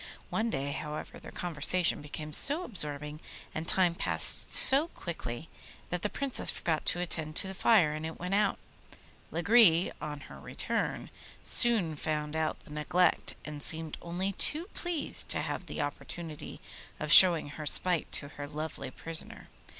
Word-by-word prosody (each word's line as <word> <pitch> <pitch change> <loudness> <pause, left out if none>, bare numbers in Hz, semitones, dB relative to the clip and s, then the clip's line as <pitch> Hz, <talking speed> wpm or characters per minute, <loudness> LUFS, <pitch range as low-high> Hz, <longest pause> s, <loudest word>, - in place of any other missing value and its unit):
One 225 +1 -2
day, 140 -8 -4
however, 150 +1 -8
their - - -13
conversation 175 +1 -1
became 150 +1 -9
so 295 - 0
absorbing 150 - -4 0.3
and 160 +1 -7
time 180 -3 +1
passed - - +5
so 280 +5 +6
quickly 160 - -9 0.4
that 180 -1 -4
the 210 - -3
Princess 275 +2 -2
forgot 160 -3 -1
to 175 - +4
attend 160 -3 -1
to 190 - +2
the 190 - -8
fire, 190 -6 +2
and 155 0 -7
it 160 0 -8
went 180 +2 -6
out. 205 0 0 0.7
Lagree, 175 0 +3
on 150 -1 -8
her - - -14
return, - - -5 0.3
soon 215 -10 +3
found 150 0 -5
out 160 -1 -4
the 150 - -15
neglect, 155 +4 -1
and 150 -1 -9
seemed 160 +1 -2
only 180 +3 -4
too 315 - -2
pleased 350 -4 -2
to - - +1
have - - -7
the - - -6
opportunity 165 -4 -8 0.4
of 150 +1 +4
showing 170 -5 +10
her 150 +1 -8
spite 180 +2 +1
to 140 - -2
her 145 0 -10
lovely 150 -2 -8
prisoner. 165 +4 -6
165 Hz, 160 wpm, -28 LUFS, 150-190 Hz, 0.7 s, showing